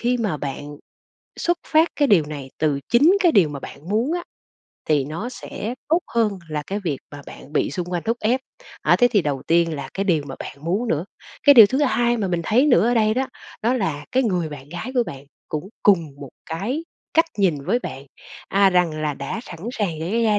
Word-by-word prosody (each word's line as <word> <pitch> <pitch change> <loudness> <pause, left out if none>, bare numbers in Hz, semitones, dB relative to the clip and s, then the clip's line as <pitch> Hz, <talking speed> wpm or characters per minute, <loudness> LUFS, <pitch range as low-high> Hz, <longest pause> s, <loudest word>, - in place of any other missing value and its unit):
khi 245 +1 +1
mà 215 -9 -1
bạn 145 +1 -6 0.6
xuất 345 0 +1
phát 320 +2 +4
cái 290 -2 +3
điều 180 -9 +5
này 145 -3 -7
từ 150 -3 +1
chính 300 +11 +5
cái 350 -4 +4
điều 190 -7 +5
mà 145 -2 -6
bạn 155 - -10
muốn 225 +9 +1
á 350 0 -1 0.7
thì 150 -3 +3
nó 165 - -5
sẽ 240 -2 -6
tốt 330 +3 +3
hơn 215 -4 +1
là 150 -1 -3
cái 200 +2 -3
việc 145 -6 -1
mà 145 0 -9
bạn 145 - -12
bị 155 - +1
xung 180 -2 -3
quanh 175 -2 -1
thúc 230 +1 0
ép. 240 +5 +1 0.4
Á, - - +4
thế 245 - +5
thì 205 -5 +3
đầu 145 -4 -2
tiên 165 -1 +3
là 140 -2 -6
cái 195 - -1
điều 170 -6 +2
mà 135 - -6
bạn - - -7
muốn 200 +9 0
nữa. 160 -4 0 0.4
Cái 285 - +8
điều 225 -5 +10
thứ 260 +6 -1
hai 240 -3 +2
mà 205 -4 -1
mình 175 -1 0
thấy 250 - +3
nữa 235 - +4
ở 245 - +2
đây 215 -2 +3
đó, 265 +2 0 0.4
đó 235 +3 +2
là 160 - -2
cái 260 - +3
người 180 -8 0
bạn 145 -2 -10
gái 175 +10 -6
của 245 - +4
bạn 135 0 -8 0.2
cũng 155 +5 -4
cùng 170 -8 +3
một 140 - -7 0.2
cái 235 - -3 0.3
cách 325 - +5
nhìn 165 -8 +1
với 220 +10 +2
bạn, 140 - -7 0.4
à, 195 0 +4
rằng 170 -4 +1
là 150 -1 -1
đã 140 +11 -5
sẵn 175 - -10
sàng 190 -10 -2
để 195 +9 -1
gia 210 -2 +3
195 Hz, 230 wpm, -22 LUFS, 155-240 Hz, 0.7 s, điều